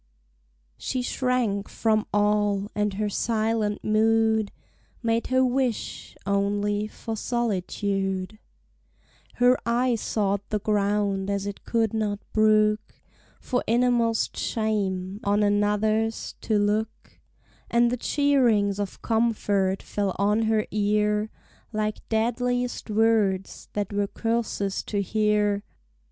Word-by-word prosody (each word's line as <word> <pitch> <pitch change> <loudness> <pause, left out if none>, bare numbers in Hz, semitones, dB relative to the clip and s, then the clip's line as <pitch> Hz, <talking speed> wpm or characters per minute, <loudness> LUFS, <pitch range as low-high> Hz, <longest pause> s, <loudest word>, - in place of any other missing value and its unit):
She 255 -1 -2
shrank 245 -6 0
from 220 -1 +1
all, 205 -1 +1
and 210 -1 -1
her 210 +1 -1
silent 215 0 0
mood 220 0 +2 0.5
Made 230 0 +1
her 260 0 +3
wish 250 -2 -2
only 205 +1 0
for 225 +1 -6
solitude: 195 -3 -2 1.0
Her 245 +1 +4
eye 240 +2 +1
sought 205 -3 0
the 215 - 0
ground, 200 -1 0
as 200 0 -1
it 205 -1 -6
could 225 -2 +1
not 210 -2 -1 0.2
brook, 215 0 +3 0.4
For 250 -2 -1
innermost 235 -1 +2
shame, 200 -3 -1
on 205 +1 +2
another's 210 +2 +1 0.2
to 215 - +4
look; 210 +2 -2 0.5
And 235 0 +3
the 250 - -1
cheerings 240 -8 +2
of 200 -2 -5
comfort 205 -4 +1
fell 200 -2 -2
on 210 +3 +2
her 220 -1 +2
ear 210 0 +1 0.4
Like 215 -1 -2
deadliest 245 +2 -1
words, 210 -3 +1
that 205 -1 -2
were 205 0 0
curses 225 -3 -2
to 205 - -2
hear! 210 0 +1
215 Hz, 110 wpm, -25 LUFS, 205-225 Hz, 1.0 s, Her